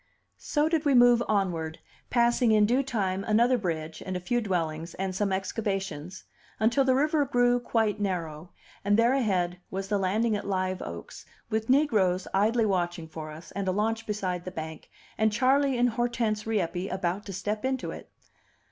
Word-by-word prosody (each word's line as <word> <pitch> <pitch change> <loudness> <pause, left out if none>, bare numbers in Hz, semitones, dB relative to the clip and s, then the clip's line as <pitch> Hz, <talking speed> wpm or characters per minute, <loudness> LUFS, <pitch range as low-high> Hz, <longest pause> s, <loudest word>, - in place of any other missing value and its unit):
So 300 0 +1
did 320 -1 +1
we 285 -3 +3
move 245 -1 +6
onward, 175 -6 -1 0.3
passing 240 -1 +3
in 210 -1 +5
due 245 +5 +2
time 195 -8 -1
another 235 +4 +3
bridge 160 -7 -3
and 185 -1 -3
a - - -4
few 240 +7 0
dwellings 165 -5 -2
and 190 0 -3
some 200 +1 0
excavations, 190 -4 -3 0.4
until 235 +5 +3
the 260 -1 +3
river 300 +2 +2
grew 245 -2 +2
quite 225 -3 0
narrow, 170 -5 -3 0.3
and 205 +1 +3
there 235 +2 +4
ahead 185 -9 0
was 195 +1 -4
the 205 -2 +1
landing 215 +4 +1
at 205 - -4
Live 185 -1 -1
Oaks, 85 0 -8 0.2
with 220 +1 -1
negroes 210 -10 +3
idly 220 +4 +3
watching 175 -4 -1
for 155 -1 -7
us, 155 +2 -11
and 195 0 -4
a - - +3
launch 220 +3 -1
beside 185 -4 -2
the 185 - -5
bank, 160 -3 -7 0.3
and 220 0 +3
Charley 265 +4 +2
and 245 +1 +4
Hortense 230 -2 -1
Rieppe 190 -3 -1
about 185 +1 -2
to 195 - -5
step 210 +3 -3
into 260 -1 -1
it. - - -10
205 Hz, 175 wpm, -28 LUFS, 180-240 Hz, 0.4 s, move